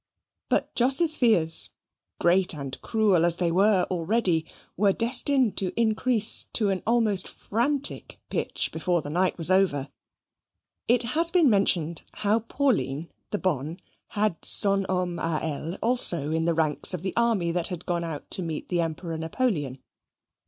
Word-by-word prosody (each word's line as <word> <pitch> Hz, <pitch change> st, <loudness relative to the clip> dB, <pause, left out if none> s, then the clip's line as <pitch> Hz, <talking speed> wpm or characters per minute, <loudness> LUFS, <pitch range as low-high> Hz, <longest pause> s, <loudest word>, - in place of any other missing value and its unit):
But -, -, -1 dB
Jos's 275 Hz, +6 st, +4 dB
fears, 165 Hz, -, +3 dB, 0.5 s
great 180 Hz, 0 st, +2 dB
and 140 Hz, -3 st, -6 dB
cruel 210 Hz, -7 st, +1 dB
as 170 Hz, 0 st, +1 dB
they 175 Hz, -2 st, 0 dB
were 195 Hz, +1 st, +3 dB
already, 180 Hz, -2 st, 0 dB, 0.3 s
were 200 Hz, 0 st, +2 dB
destined 250 Hz, +1 st, +2 dB
to 190 Hz, +3 st, -3 dB
increase 220 Hz, 0 st, +3 dB
to 210 Hz, -3 st, +1 dB
an 190 Hz, -, -3 dB
almost 220 Hz, -5 st, +1 dB
frantic 265 Hz, +6 st, -3 dB
pitch -, -, -2 dB
before 165 Hz, 0 st, -1 dB
the 145 Hz, -, -7 dB
night 180 Hz, +3 st, 0 dB
was 170 Hz, +1 st, +1 dB
over. 160 Hz, -8 st, +1 dB, 1.0 s
It 245 Hz, +1 st, +2 dB
has 325 Hz, +8 st, +1 dB
been 335 Hz, -7 st, +3 dB
mentioned 170 Hz, -5 st, 0 dB
how 210 Hz, +1 st, 0 dB
Pauline, 170 Hz, -, -2 dB, 0.2 s
the 210 Hz, -, -2 dB
bonne, 160 Hz, -2 st, -3 dB, 0.3 s
had 210 Hz, -4 st, -2 dB
son 195 Hz, -1 st, +3 dB
homme 180 Hz, -2 st, -2 dB
a 165 Hz, -2 st, -1 dB
elle 160 Hz, +2 st, -4 dB
also 180 Hz, -, +2 dB
in 160 Hz, 0 st, -1 dB
the 170 Hz, -1 st, 0 dB
ranks 155 Hz, +3 st, +2 dB
of 175 Hz, -, -9 dB
the 190 Hz, -, -3 dB
army 225 Hz, -8 st, +1 dB
that 170 Hz, -1 st, -1 dB
had 180 Hz, -1 st, -7 dB
gone 175 Hz, -1 st, -2 dB
out 160 Hz, -3 st, -7 dB
to -, -, -1 dB
meet 160 Hz, -3 st, -6 dB
the 175 Hz, -1 st, 0 dB
Emperor 165 Hz, 0 st, -5 dB
Napoleon. 160 Hz, -, -2 dB
185 Hz, 155 wpm, -25 LUFS, 165-220 Hz, 1.0 s, Jos's